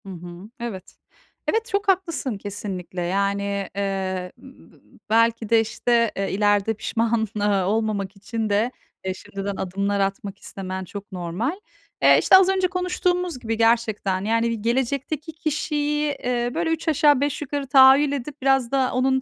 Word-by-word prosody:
Hı - - -9
hı. 175 +2 -9
Evet. 230 -6 -7 0.5
Evet, 450 0 +1
çok 405 -3 -2
haklısın 335 - 0
kesinlikle. 195 -3 -6
Yani, 200 +2 -1
eee, 190 -2 -2
ııı, 265 0 -16
bı - - -23 0.3
belki 230 0 +2
de, 230 - +5
işte, 230 +1 +1
eee, 195 0 -1
ileride 205 +1 +2
pişman, 225 +1 0
ııı, 205 -2 +1
olmamak 210 -1 -1
için 220 +2 -4
de, 210 +4 +1 0.3
eee, 190 - -1
şimdiden 195 +1 -6
adımlar 200 +2 -1
atmak 195 0 -2
istemen 190 -1 -6
çok 200 +3 -9
normal. 185 - -2 0.5
Eee, - - +7
işte, - - +6
az 380 0 +4
önce 380 -1 +2
konuştuğumuz 360 -3 -1
gibi 225 -2 -3
gerçekten, 220 -4 +1
yani, 230 +1 +1
bi 230 -2 -3
gelecekteki 265 +6 -1
kişiyi, 300 -2 -1
eee, 245 -1 0
böyle 330 0 -1
üç 325 +1 -2
aşağı 295 -3 +4
beş 285 +1 -1
yukarı 285 -1 -3
tahayyül 270 +2 +7
edip 285 +1 -5
biraz 270 -3 +2
da 265 -2 +2
onun 265 +1 +2
230 Hz, 155 wpm, -23 LUFS, 200-280 Hz, 0.5 s, Eee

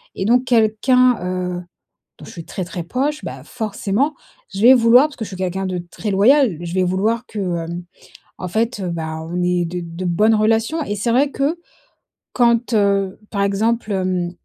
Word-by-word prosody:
et 190 - -3
donc 245 +4 +3
quelqu'un, 245 +2 +3 0.4
heu, - - -9 0.6
dont - - -12
je - - -11
suis 165 -2 -9
très, 185 - -5
très 175 -1 -6
proche, 280 - -2
bah, - - -7
forcément 220 +5 -2 0.4
je 195 - -4
vais 245 +4 +8
vouloir 245 +3 +6
parce 300 - -15
que 225 - -4
je - - -9
suis 190 - -8
quelqu'un 190 +1 -2
de 185 -1 -2
très 215 - -4
loyal 225 - +4
je 170 0 -5
vais 185 - +2
vouloir 200 +6 0
que, 215 - -7 0.3
hem, 170 +1 -6 0.6
en 185 - -4
fait, 225 +1 -1
heu, 180 - -3
bah, 160 -1 -4
on 175 +2 -3
ait 175 -1 +1
de 180 +2 -4
de 170 +2 -7
bonnes 210 +6 +3
relations 225 +9 +1
et 205 - -3
c'est 210 +4 -2
vrai 275 +4 +2
que, 285 +5 -1 0.8
quand, 235 -1 +2
heu, 200 -2 +1
par 200 - -1
exemple, 215 +3 0
hem, 185 -2 -1
210 Hz, 195 wpm, -19 LUFS, 185-240 Hz, 0.8 s, vais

